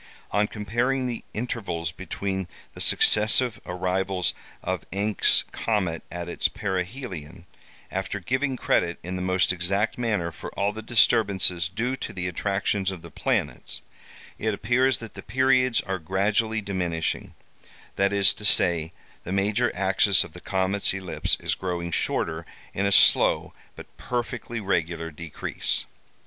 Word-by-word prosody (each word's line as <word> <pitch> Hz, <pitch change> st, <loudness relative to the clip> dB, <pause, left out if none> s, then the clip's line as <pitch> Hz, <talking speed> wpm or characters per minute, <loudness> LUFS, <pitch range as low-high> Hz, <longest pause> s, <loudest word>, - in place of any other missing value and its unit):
On 105 Hz, +1 st, +2 dB
comparing 120 Hz, +6 st, -1 dB
the 120 Hz, -2 st, -3 dB
intervals 100 Hz, -8 st, -3 dB
between 95 Hz, +2 st, -4 dB, 0.3 s
the -, -, -8 dB
successive 110 Hz, +1 st, +4 dB
arrivals 90 Hz, +1 st, -1 dB, 0.3 s
of -, -, -2 dB
Encke's 105 Hz, +2 st, +3 dB
comet 95 Hz, -8 st, -1 dB
at 85 Hz, 0 st, -5 dB
its 85 Hz, -, +1 dB
perihelion, 95 Hz, -, -5 dB, 0.5 s
after 95 Hz, +2 st, -3 dB
giving 130 Hz, +7 st, -1 dB
credit, 85 Hz, -7 st, +1 dB
in 90 Hz, +1 st, -4 dB
the 90 Hz, -, -3 dB
most 95 Hz, 0 st, +2 dB
exact 100 Hz, +6 st, -1 dB
manner, 105 Hz, -8 st, 0 dB
for -, -, -8 dB
all 100 Hz, +1 st, 0 dB
the 110 Hz, -, -6 dB
disturbances 100 Hz, -6 st, +3 dB
due 120 Hz, +7 st, -1 dB
to -, -, -6 dB
the 90 Hz, -1 st, -3 dB
attractions 95 Hz, +2 st, 0 dB
of 95 Hz, -3 st, -6 dB
the -, -, -10 dB
planets, -, -, -1 dB, 0.6 s
it 110 Hz, -1 st, 0 dB
appears 125 Hz, +4 st, +2 dB
that 115 Hz, -1 st, -9 dB
the -, -, -8 dB
periods 130 Hz, -2 st, +3 dB
are 95 Hz, -1 st, -3 dB
gradually 105 Hz, +6 st, +1 dB
diminishing; 90 Hz, -5 st, -2 dB, 0.6 s
that 100 Hz, 0 st, +2 dB
is 100 Hz, -1 st, +6 dB
to -, -, -9 dB
say, 85 Hz, -4 st, +3 dB, 0.3 s
the 90 Hz, -, -6 dB
major 105 Hz, +5 st, +1 dB
axis 95 Hz, +1 st, +3 dB
of -, -, -12 dB
the -, -, -11 dB
comet's 95 Hz, +1 st, 0 dB
ellipse 95 Hz, -2 st, -1 dB
is -, -, -1 dB
growing 85 Hz, -2 st, -3 dB
shorter, 80 Hz, 0 st, -1 dB, 0.3 s
in 100 Hz, +1 st, 0 dB
a -, -, 0 dB
slow -, -, +5 dB, 0.2 s
but -, -, -9 dB
perfectly 120 Hz, -1 st, -3 dB
regular 85 Hz, -4 st, -1 dB
decrease. 80 Hz, 0 st, -3 dB
95 Hz, 140 wpm, -25 LUFS, 90-110 Hz, 0.6 s, is